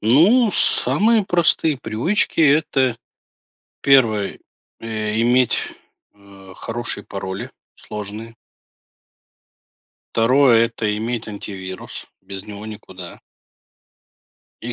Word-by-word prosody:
Ну, 185 - +4
самые 220 +1 +3
простые 165 -4 +2
привычки- 130 - -1
это 140 -5 +2 0.9
1: 115 -7 +3 0.4
э, 110 -1 -3
иметь, 125 +1 +3 0.6
а, 100 -2 -16
хорошие 115 -2 -2
пароли 100 +5 -6 0.2
сложные. 105 +2 -8 1.8
2- 115 0 +4
это 110 -2 -3
иметь 115 +1 -3
антивирус, 95 -3 -8 0.2
без 95 0 -8
него 105 0 -9
никуда. 95 -5 -10 1.4
И 120 +2 -5
115 Hz, 80 wpm, -20 LUFS, 105-135 Hz, 1.8 s, Ну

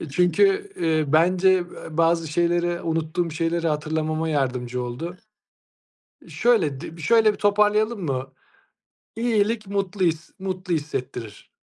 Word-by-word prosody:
E 160 - -6
çünkü, 390 - +2
eee, 160 -2 +1
bence, 180 +4 +4
eee, 180 -1 0 0.3
bazı 165 -1 +2
şeyleri, 175 +1 0
unuttuğum 165 +1 -1
şeyleri, 165 +1 -1
hatırlamama 155 +1 -1
yardımcı 125 -4 -1
oldu. 160 +9 -5 1.1
Şöyle, 155 - +1
d 165 0 -8
şöyle 220 +7 +4
bir - - -10
toparlayalım 210 0 +2
mı? 135 -2 -3 0.8
İyilik 225 -2 0
mutlu 195 -1 -1
his 165 0 -2
mutlu 185 -1 -3
hissettirir. 125 -7 -5
170 Hz, 120 wpm, -23 LUFS, 155-200 Hz, 1.1 s, bence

